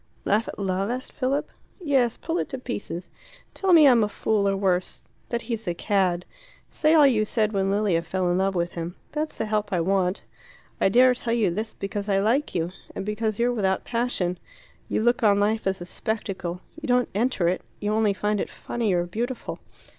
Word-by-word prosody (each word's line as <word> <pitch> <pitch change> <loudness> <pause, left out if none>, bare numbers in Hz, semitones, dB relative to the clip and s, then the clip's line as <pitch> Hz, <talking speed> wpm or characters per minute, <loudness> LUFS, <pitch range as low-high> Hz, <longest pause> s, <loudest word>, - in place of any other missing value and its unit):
"Laugh 215 +3 +2
at - - -7
love?" 195 0 -1
asked 250 +2 -4
Philip. 275 +2 -1 0.3
"Yes. 270 -9 +1
Pull 330 +1 -2
it - - -2
to 265 - -4
pieces. 190 -8 -5 0.4
Tell 385 -1 0
me 320 -4 +8
I'm 240 -4 +6
a 210 - 0
fool 210 -1 0
or 195 - 0
worse 185 -2 -1 0.2
that 235 -1 -2
he's 225 -4 -4
a 175 - -1
cad. 185 -3 +1 0.5
Say 310 +1 +3
all 300 -2 +7
you 235 -6 +4
said 215 0 0
when 195 -1 +1
Lilia 200 -4 +2
fell 180 +1 -1
in 180 - +1
love 195 0 +1
with 170 0 0
him. 170 +1 -5 0.2
That's 305 +1 -3
the - - -1
help 210 -1 -1
I 180 - +1
want. 185 +1 +1 0.6
I - - +5
dare 250 +5 +6
tell 240 -1 -2
you 220 -6 +2
this 215 +5 -3
because 200 +1 -4
I 195 - +3
like 235 +9 +1
you 170 0 0 0.2
and - - -4
because 210 0 -1
you're 240 +1 +2
without 190 -4 0
passion; 230 -7 -1 0.5
you - - 0
look 240 +1 +3
on 205 -3 +4
life 215 +1 +1
as 190 -1 -1
a - - -5
spectacle; 195 -4 -4 0.2
you 305 - -5
don't 250 -1 +2
enter 210 -4 +1
it; 180 +2 0 0.2
you 210 0 -1
only 215 -1 +3
find 210 0 0
it - - -3
funny 225 -5 -2
or 175 -1 +2
beautiful. 235 +8 -4
210 Hz, 205 wpm, -25 LUFS, 190-240 Hz, 0.6 s, me